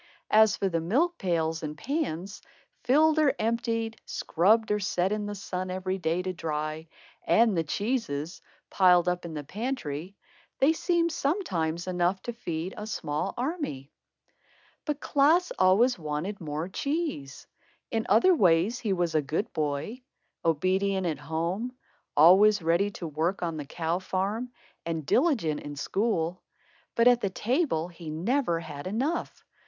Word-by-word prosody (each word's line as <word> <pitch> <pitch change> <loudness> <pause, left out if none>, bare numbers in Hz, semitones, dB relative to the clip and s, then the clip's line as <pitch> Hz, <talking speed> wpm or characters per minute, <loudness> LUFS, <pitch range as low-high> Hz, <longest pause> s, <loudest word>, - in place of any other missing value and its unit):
As 215 -1 +5
for 195 - 0
the 165 -3 -1
milk 300 - +1
pails 165 -4 0
and 150 -1 -5
pans, 200 - -3 0.4
filled 310 +5 +4
or 285 -3 +3
emptied, 230 0 -1
scrubbed 215 +6 +2
or 210 - +2
set 190 -1 0
in 210 -1 -2
the 205 - -4
sun 185 -2 -4
every 185 +1 -3
day 170 +1 0
to 185 0 -3
dry, 155 -1 -4 0.4
and 225 -3 +4
the 165 - +1
cheeses, 175 - -2 0.3
piled 180 -2 +5
up 180 0 -1
in 165 -2 -6
the 150 - -4
pantry, 195 - -4 0.4
they 285 +4 +4
seemed 340 0 +1
sometimes 180 - -1
enough 180 +1 0
to 240 - -4
feed 175 -5 -4
a 210 - -6
small 150 -8 -3
army. 250 - -3 0.9
But 300 -2 -2
Klaas 315 +6 +3
always 200 +5 +4
wanted 155 +6 -4
more 155 +1 -3
cheese. 275 - -3 0.5
In 225 -1 -1
other 230 - +6
ways, 190 - +3
he 215 -5 -1
was 175 -3 0
a 155 - +3
good 155 +8 -3
boy, 155 - -2 0.4
obedient 190 +4 +1
at 160 -3 -2
home, 175 +10 -3 0.4
always 190 +5 +6
ready 170 +5 +2
to 190 -3 -8
work 160 +5 -1
on 165 -2 -2
the 145 - -5
cow 165 +4 -2
farm, 200 +6 -2 0.3
and 165 -3 -3
diligent 235 - +2
in 145 0 -7
school. 180 +1 -1 0.5
But 230 +1 +4
at 245 -1 +5
the 200 - 0
table 215 - 0
he 170 -2 -9
never 175 - 0
had 150 -1 -7
enough. 265 - -2
185 Hz, 150 wpm, -28 LUFS, 165-230 Hz, 0.9 s, other